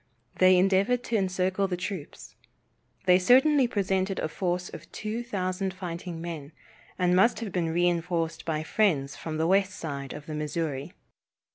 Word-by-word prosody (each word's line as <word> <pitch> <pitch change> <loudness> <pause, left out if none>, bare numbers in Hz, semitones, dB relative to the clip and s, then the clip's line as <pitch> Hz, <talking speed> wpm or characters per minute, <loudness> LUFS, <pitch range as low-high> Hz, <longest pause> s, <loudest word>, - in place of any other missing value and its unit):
They 185 0 +7
endeavored 195 +6 +3
to 235 - -2
encircle 190 0 +1
the 180 -2 -2
troops. 185 -4 -6 0.7
They 180 0 +6
certainly 260 +6 +5
presented 195 -2 0
a 155 - -2
force 180 +1 -2
of - - -11
two 220 +2 -4
thousand 190 -4 -2
fighting 175 -2 -6
men, 165 -3 -6 0.4
and 180 -1 +2
must 210 +4 +4
have 215 -4 -4
been 175 -3 0
reinforced 170 -1 0
by 155 -1 -2
friends 155 -8 +1
from 155 -1 -5
the 160 - +1
west 195 +2 +3
side 140 -4 -5
of 150 0 -9
the 155 - -6
Missouri. 150 0 -3
180 Hz, 155 wpm, -27 LUFS, 165-195 Hz, 0.7 s, They